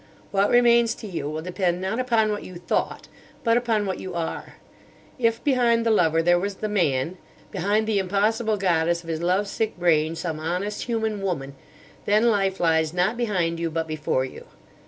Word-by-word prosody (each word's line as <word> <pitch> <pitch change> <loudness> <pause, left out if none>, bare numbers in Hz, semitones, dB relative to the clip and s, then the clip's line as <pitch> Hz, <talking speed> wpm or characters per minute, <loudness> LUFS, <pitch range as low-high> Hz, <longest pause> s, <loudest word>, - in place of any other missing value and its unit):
What 200 0 +2
remains 235 -1 +4
to - - -10
you 165 -7 -4
will 155 +1 -4
depend 180 0 -1
not 190 +6 -2
upon 230 -4 +2
what 205 - -3
you 185 - -10
thought, 175 0 -2 0.4
but 230 -1 +3
upon 230 -4 +1
what 190 -1 -3
you 185 -2 -6
are. 165 -1 -4 0.6
If 230 -1 +1
behind 240 -4 +2
the 230 - +3
lover 165 -5 +3
there 175 +1 +4
was 200 +2 -3
the 215 - -3
man—behind 185 +4 -1
the 215 -2 +1
impossible 210 +3 +1
goddess 170 -2 +1
of 165 - -10
his 160 0 -2
love 185 +4 +1
sick 220 +1 -2
brain 165 -2 +2
some 160 -2 -4
honest, 180 +6 -3
human 220 -3 -2
woman, 140 -8 -3 0.5
then 215 +3 +4
life 195 -2 0
lies 160 -1 +1
not 185 +6 +1
behind 180 -8 -1
you, 165 0 -1
but 160 0 -2
before 150 -4 -1
you. 130 - -10
190 Hz, 180 wpm, -24 LUFS, 165-220 Hz, 0.6 s, remains